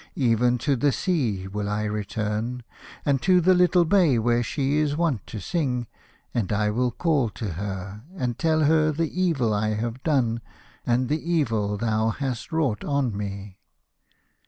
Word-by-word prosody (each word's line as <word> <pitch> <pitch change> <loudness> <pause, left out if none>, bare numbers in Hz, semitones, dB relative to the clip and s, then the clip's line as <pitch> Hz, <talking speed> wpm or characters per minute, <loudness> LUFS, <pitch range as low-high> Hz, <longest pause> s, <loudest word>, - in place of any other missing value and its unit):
Even 125 -1 +2
to 140 +4 +1
the 140 +3 +2
sea 125 - -1
will 100 +1 -3
I 105 +1 -1
return, 105 +3 -3 0.4
and 140 -3 +2
to 185 -1 +4
the 185 +2 +4
little 180 -1 +4
bay 170 -8 +4
where 120 +1 +2
she 140 +4 0
is 150 -1 0
wont 160 - 0
to 110 - -6
sing, 125 - -1 0.5
and 110 -5 -1
I 105 0 +1
will 125 +3 +1
call 140 -2 +1
to 105 0 -5
her 100 +2 -5
and 125 -9 -3
tell 160 -1 +2
her 155 +1 +4
the 165 +4 -2
evil 135 -12 +1
I 110 +1 0
have 115 +3 -3
done 120 -7 +1 0.5
and 125 +1 +2
the 150 +3 -1
evil 110 -10 0
thou 110 0 +1
hast 130 +3 -4
wrought 145 -10 0
on 140 -6 0
me." 100 -1 -6
120 Hz, 165 wpm, -25 LUFS, 105-150 Hz, 0.5 s, to